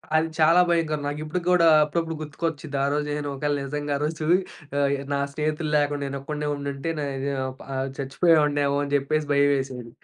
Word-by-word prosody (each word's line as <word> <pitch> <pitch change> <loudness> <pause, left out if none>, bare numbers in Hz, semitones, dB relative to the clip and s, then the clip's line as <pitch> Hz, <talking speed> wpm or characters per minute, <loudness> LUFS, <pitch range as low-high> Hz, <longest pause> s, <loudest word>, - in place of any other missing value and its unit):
అది 160 +1 +3
చాలా 165 +3 +6
భయంకరం. 160 -3 +1
నాకిప్పటిక్కుడా 170 +4 +1 0.2
అప్పుడప్పుడు 165 +2 -2
గుర్తుకొచ్చిద్ది 150 -1 -4
ఆరోజు 145 +1 0
నేను 145 -1 -3
ఒకవేళ 145 +1 -1
నిజంగా 145 +1 -3
ఆ - - -6
రోజు 155 0 -2 0.5
ఆహ్, 140 0 +2 0.2
నా 140 - 0
స్నేహితులు 155 +1 -2
లేకుండా 145 0 0
నేనొక్కడినే 140 +2 -4
ఉండుంటే, 140 +2 -4
నే 145 - -1 0.2
వు 140 0 -1 0.4
ఆహ్, 130 +1 -1
చచ్చిపోయేవాడినేమో 145 0 +2
అనిచెప్పేసి 145 +1 0
భయమేసెది. 135 -4 +1
145 Hz, 145 wpm, -25 LUFS, 140-155 Hz, 0.5 s, చాలా